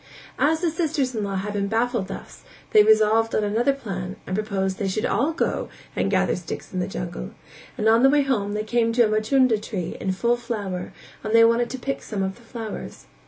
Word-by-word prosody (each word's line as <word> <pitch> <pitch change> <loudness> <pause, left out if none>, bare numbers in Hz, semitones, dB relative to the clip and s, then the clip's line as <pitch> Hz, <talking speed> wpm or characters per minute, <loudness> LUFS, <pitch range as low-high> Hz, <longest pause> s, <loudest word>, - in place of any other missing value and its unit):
As 315 +2 +2
the 340 -3 +1
sisters 310 -5 -1
in 220 -3 -2
law 195 -1 -3
had 200 +2 -3
been 200 -1 -1
baffled 225 -1 0
thus, - - -9 0.3
they 210 - +8
resolved 220 +1 +4
on 215 - +2
another 225 +6 +2
plan 195 -8 -5
and 185 - -3
proposed 195 -2 -1
that 200 - -1
they - - 0
should 215 +3 -1
all 280 +7 +1
go 325 - -1 0.3
and - - 0
gather - - +2
sticks - - -7
in 185 - -1
the 180 - -1
jungle; 60 0 -5 0.4
and 215 - 0
on 225 +1 +5
the 270 - +6
way 290 0 +4 0.3
they 210 +1 -2
came 230 +1 +1
to 240 0 +5
a - - +2
machunda 220 +2 +3
tree 205 -4 -5
in 190 - -1
full 235 +6 +1
flower 205 -7 -4 0.3
and 215 0 0
they 230 0 +8
wanted 235 +1 +2
to 260 - -4
pick 275 +2 -3
some 200 -3 -3
of 190 0 -2
the - - -18
flowers. 225 - -7
220 Hz, 220 wpm, -24 LUFS, 200-240 Hz, 0.4 s, they